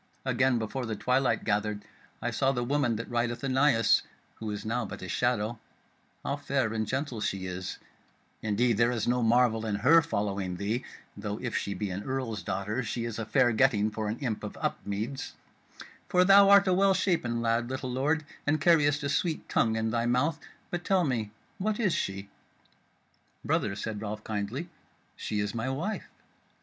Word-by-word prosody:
Again, 130 Hz, 0 st, +2 dB
before 115 Hz, +3 st, -3 dB
the 110 Hz, -, -2 dB
twilight 125 Hz, +5 st, +1 dB
gathered 105 Hz, 0 st, -1 dB, 0.4 s
I -, -, 0 dB
saw 135 Hz, -, +2 dB
the 120 Hz, -2 st, -1 dB
woman 130 Hz, -2 st, +1 dB
that 115 Hz, +2 st, -5 dB
rideth 120 Hz, 0 st, -1 dB
anigh 135 Hz, 0 st, +3 dB
us 115 Hz, -, +4 dB, 0.4 s
(who 110 Hz, -, -5 dB
is 105 Hz, 0 st, -5 dB
now 120 Hz, +3 st, -1 dB
but 105 Hz, -, -7 dB
a -, -, -5 dB
shadow) 120 Hz, 0 st, 0 dB, 0.7 s
how 140 Hz, -, -1 dB
fair 135 Hz, -5 st, -1 dB
and 110 Hz, -1 st, -1 dB
gentle 130 Hz, -2 st, -2 dB
she 95 Hz, -2 st, -2 dB
is: 90 Hz, 0 st, -5 dB, 0.6 s
indeed 110 Hz, +2 st, +1 dB
there 115 Hz, +1 st, +4 dB
is 120 Hz, -3 st, -1 dB
no 125 Hz, +1 st, +2 dB
marvel 115 Hz, -1 st, +3 dB
in 110 Hz, -2 st, -1 dB
her 145 Hz, +11 st, +6 dB
following 100 Hz, -, -2 dB
thee 110 Hz, +7 st, -1 dB, 0.3 s
(though 105 Hz, 0 st, -4 dB
if 125 Hz, -1 st, -4 dB
she 100 Hz, -, -2 dB
be 100 Hz, +1 st, -3 dB
an 95 Hz, +2 st, -3 dB
earl's 130 Hz, -5 st, -3 dB
daughter 100 Hz, +5 st, -2 dB
she 115 Hz, 0 st, -3 dB
is 115 Hz, -1 st, -4 dB
a 110 Hz, -, -4 dB
fair 120 Hz, +2 st, +4 dB
getting 110 Hz, -3 st, +3 dB
for 110 Hz, 0 st, -3 dB
an 110 Hz, +2 st, -2 dB
imp 120 Hz, -6 st, -3 dB
of -, -, -6 dB
Upmeads), 110 Hz, +7 st, -3 dB, 0.8 s
for 180 Hz, 0 st, +4 dB
thou 195 Hz, +1 st, +8 dB
art 200 Hz, 0 st, +7 dB
a 185 Hz, -, +4 dB
well 195 Hz, +1 st, +4 dB
shapen 165 Hz, -11 st, 0 dB
lad, 115 Hz, +1 st, 0 dB
little 130 Hz, -1 st, -3 dB
lord, 150 Hz, +5 st, 0 dB, 0.2 s
and 155 Hz, +1 st, +2 dB
carriest 150 Hz, -3 st, +4 dB
a -, -, 0 dB
sweet 160 Hz, +2 st, -1 dB
tongue 110 Hz, -1 st, +2 dB
in 110 Hz, 0 st, 0 dB
thy 115 Hz, 0 st, 0 dB
mouth. 145 Hz, +7 st, +1 dB, 0.3 s
But 175 Hz, 0 st, -3 dB
tell 190 Hz, -1 st, +3 dB
me, 120 Hz, -8 st, -1 dB, 0.3 s
what 210 Hz, +3 st, -1 dB
is 200 Hz, -7 st, +2 dB
she?" 95 Hz, 0 st, -2 dB, 1.2 s
"Brother," 100 Hz, -2 st, 0 dB
said 105 Hz, 0 st, -4 dB
Ralph 105 Hz, 0 st, -5 dB
kindly, 110 Hz, -, -3 dB, 0.5 s
"she 105 Hz, -, -3 dB
is 105 Hz, 0 st, -1 dB
my 115 Hz, +2 st, -2 dB
wife." 170 Hz, +11 st, -3 dB
120 Hz, 185 wpm, -29 LUFS, 105-135 Hz, 1.2 s, thou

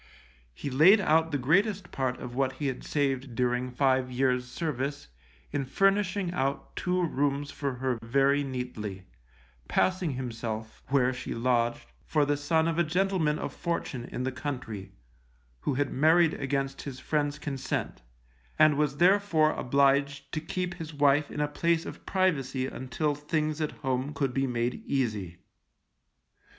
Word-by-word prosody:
He 140 Hz, -, -5 dB
laid 170 Hz, +11 st, +7 dB
out 160 Hz, -3 st, +3 dB
the 145 Hz, -, +1 dB
greatest 185 Hz, -, +1 dB
part 130 Hz, -2 st, -1 dB
of 120 Hz, -, -7 dB
what 130 Hz, 0 st, 0 dB
he 145 Hz, +3 st, -5 dB
had 130 Hz, -2 st, -2 dB
saved 135 Hz, -4 st, -1 dB
during 125 Hz, 0 st, 0 dB
five 130 Hz, 0 st, +2 dB
years' 125 Hz, 0 st, +1 dB
service 140 Hz, -, -3 dB, 0.4 s
in 145 Hz, -, -1 dB
furnishing 195 Hz, +4 st, +1 dB
out 140 Hz, -4 st, -2 dB
two 180 Hz, 0 st, 0 dB
rooms 145 Hz, -1 st, -1 dB
for 140 Hz, -3 st, -3 dB
her 125 Hz, -1 st, -1 dB
very 140 Hz, +4 st, +2 dB
neatly, 125 Hz, -7 st, -5 dB, 0.6 s
passing 185 Hz, -5 st, +1 dB
himself, 115 Hz, -3 st, -5 dB
where 130 Hz, -1 st, +2 dB
she 125 Hz, -, -5 dB
lodged, 120 Hz, 0 st, +1 dB, 0.2 s
for 150 Hz, -2 st, +2 dB
the 145 Hz, +1 st, +1 dB
son 160 Hz, +3 st, +1 dB
of 165 Hz, 0 st, 0 dB
a -, -, +5 dB
gentleman 175 Hz, -2 st, +1 dB
of -, -, -4 dB
fortune 155 Hz, -8 st, -3 dB
in 125 Hz, -, -5 dB
the 130 Hz, -, -1 dB
country, 125 Hz, -7 st, -5 dB, 0.7 s
who 130 Hz, -, -1 dB
had 145 Hz, +1 st, 0 dB
married 160 Hz, +3 st, +4 dB
against 135 Hz, 0 st, -2 dB
his 135 Hz, -2 st, -7 dB
friends' 145 Hz, 0 st, -1 dB
consent, 140 Hz, -5 st, -3 dB, 0.6 s
and 155 Hz, -2 st, +5 dB
was 145 Hz, -2 st, +1 dB
therefore 175 Hz, -3 st, +4 dB
obliged 140 Hz, +1 st, +1 dB
to 155 Hz, -, -2 dB
keep 180 Hz, +2 st, -3 dB
his 165 Hz, -3 st, -8 dB
wife 145 Hz, 0 st, +3 dB
in 150 Hz, -, -3 dB
a 150 Hz, -, +2 dB
place 165 Hz, +3 st, 0 dB
of -, -, -9 dB
privacy 140 Hz, -9 st, +1 dB
until 130 Hz, +4 st, -2 dB
things 150 Hz, +1 st, -2 dB
at 155 Hz, -, 0 dB
home 130 Hz, +3 st, -1 dB
could 135 Hz, -3 st, 0 dB
be 135 Hz, +1 st, +1 dB
made 120 Hz, 0 st, -1 dB
easy. 105 Hz, -10 st, -1 dB
140 Hz, 155 wpm, -28 LUFS, 130-155 Hz, 0.7 s, laid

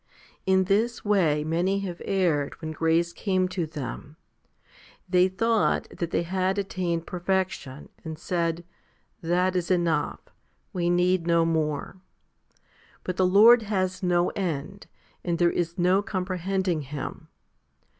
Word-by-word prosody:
17. 190 Hz, -, +4 dB
In 190 Hz, -, +4 dB
this 220 Hz, +6 st, 0 dB
way 170 Hz, -8 st, +2 dB
many 175 Hz, +5 st, 0 dB
have 180 Hz, -3 st, -6 dB
erred 170 Hz, -8 st, 0 dB
when 160 Hz, -1 st, -5 dB
grace 165 Hz, +2 st, +1 dB
came 185 Hz, -3 st, 0 dB
to 180 Hz, -3 st, -3 dB
them. 150 Hz, 0 st, -7 dB, 0.9 s
They 180 Hz, 0 st, +4 dB
thought 225 Hz, +4 st, +1 dB
that 170 Hz, -, -3 dB
they 170 Hz, -, 0 dB
had 185 Hz, +2 st, -1 dB
attained 180 Hz, -4 st, -2 dB
perfection, 180 Hz, -7 st, -3 dB
and 160 Hz, -1 st, -6 dB
said, 170 Hz, 0 st, -2 dB, 0.3 s
" -, -, -42 dB
That 180 Hz, +2 st, +1 dB
is 175 Hz, -1 st, -1 dB
enough; 170 Hz, -5 st, 0 dB, 0.5 s
we 175 Hz, -1 st, 0 dB
need 175 Hz, 0 st, +2 dB
no 170 Hz, -1 st, +3 dB
more." 160 Hz, +1 st, -1 dB, 1.1 s
But 185 Hz, 0 st, -4 dB
the 185 Hz, -, +3 dB
Lord 225 Hz, +6 st, +7 dB
has 190 Hz, -3 st, -2 dB
no 175 Hz, -1 st, +2 dB
end, 185 Hz, +1 st, -4 dB, 0.4 s
and 170 Hz, -1 st, -1 dB
there 170 Hz, 0 st, +3 dB
is 170 Hz, -1 st, -2 dB
no 180 Hz, +2 st, +3 dB
comprehending 185 Hz, -3 st, -2 dB
Him. 145 Hz, 0 st, -7 dB
180 Hz, 135 wpm, -26 LUFS, 165-190 Hz, 1.1 s, Lord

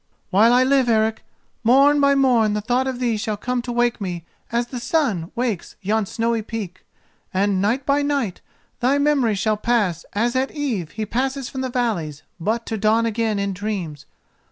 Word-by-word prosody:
While 215 Hz, +5 st, +5 dB
I 250 Hz, +1 st, +5 dB
live, 265 Hz, -2 st, +3 dB
Eric, 220 Hz, -1 st, +1 dB, 0.4 s
morn 275 Hz, +5 st, +5 dB
by 280 Hz, 0 st, +4 dB
morn 245 Hz, -6 st, +3 dB
the 210 Hz, -, -1 dB
thought 245 Hz, +4 st, 0 dB
of 260 Hz, -2 st, -2 dB
thee 235 Hz, -3 st, 0 dB
shall 215 Hz, -1 st, -2 dB
come 250 Hz, +3 st, -2 dB
to 240 Hz, 0 st, -5 dB
wake 240 Hz, -1 st, +1 dB
me 175 Hz, -3 st, -4 dB, 0.3 s
as 235 Hz, +1 st, +1 dB
the 245 Hz, +1 st, -6 dB
sun 235 Hz, -, 0 dB
wakes 235 Hz, -7 st, -2 dB
yon 210 Hz, +1 st, 0 dB
snowy 230 Hz, +1 st, -1 dB
peak, 210 Hz, -5 st, -6 dB, 0.5 s
and 195 Hz, 0 st, +1 dB
night 240 Hz, +7 st, 0 dB
by 285 Hz, +1 st, +2 dB
night 280 Hz, -10 st, -1 dB, 0.4 s
thy 260 Hz, +3 st, +2 dB
memory 285 Hz, -7 st, +2 dB
shall 215 Hz, +2 st, 0 dB
pass 210 Hz, -7 st, 0 dB
as 235 Hz, +4 st, 0 dB
at 260 Hz, +1 st, +1 dB
eve 245 Hz, -, -3 dB
he 215 Hz, -1 st, -3 dB
passes 265 Hz, +4 st, -2 dB
from 260 Hz, -, -5 dB
the 260 Hz, -, -2 dB
valleys, 175 Hz, -, -2 dB, 0.2 s
but 220 Hz, +7 st, -1 dB
to 220 Hz, -2 st, -3 dB
dawn 220 Hz, +2 st, +3 dB
again 225 Hz, -1 st, 0 dB
in 200 Hz, -1 st, -1 dB
dreams. 180 Hz, -8 st, -5 dB
230 Hz, 185 wpm, -22 LUFS, 205-255 Hz, 0.5 s, While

